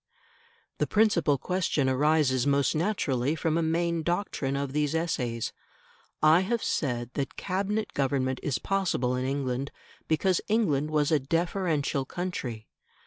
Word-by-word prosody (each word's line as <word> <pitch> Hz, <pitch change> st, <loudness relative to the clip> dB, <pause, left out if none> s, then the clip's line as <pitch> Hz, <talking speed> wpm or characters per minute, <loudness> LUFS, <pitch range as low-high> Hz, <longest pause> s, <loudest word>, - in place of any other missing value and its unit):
The -, -, +1 dB
principal 195 Hz, -9 st, +3 dB
question 165 Hz, -2 st, 0 dB
arises 140 Hz, -1 st, +2 dB
most 140 Hz, -1 st, +2 dB
naturally 155 Hz, -, 0 dB
from 160 Hz, 0 st, 0 dB
a 170 Hz, -, +2 dB
main 165 Hz, +1 st, 0 dB
doctrine 170 Hz, -5 st, -1 dB
of 140 Hz, -1 st, -3 dB
these 150 Hz, +1 st, 0 dB
essays. 125 Hz, -9 st, -1 dB, 0.7 s
I 155 Hz, +2 st, +7 dB
have 220 Hz, +5 st, -1 dB
said 120 Hz, -4 st, -1 dB
that 140 Hz, -1 st, -3 dB
Cabinet 200 Hz, +3 st, -2 dB
government 130 Hz, -2 st, 0 dB
is 140 Hz, -4 st, -1 dB
possible 180 Hz, -11 st, 0 dB
in 125 Hz, 0 st, -2 dB
England 135 Hz, 0 st, -2 dB, 0.4 s
because 180 Hz, +3 st, +2 dB
England 155 Hz, -10 st, +1 dB
was 150 Hz, 0 st, +1 dB
a 155 Hz, -, +4 dB
deferential 160 Hz, -2 st, 0 dB
country. 125 Hz, -11 st, -5 dB
150 Hz, 135 wpm, -28 LUFS, 135-175 Hz, 0.7 s, I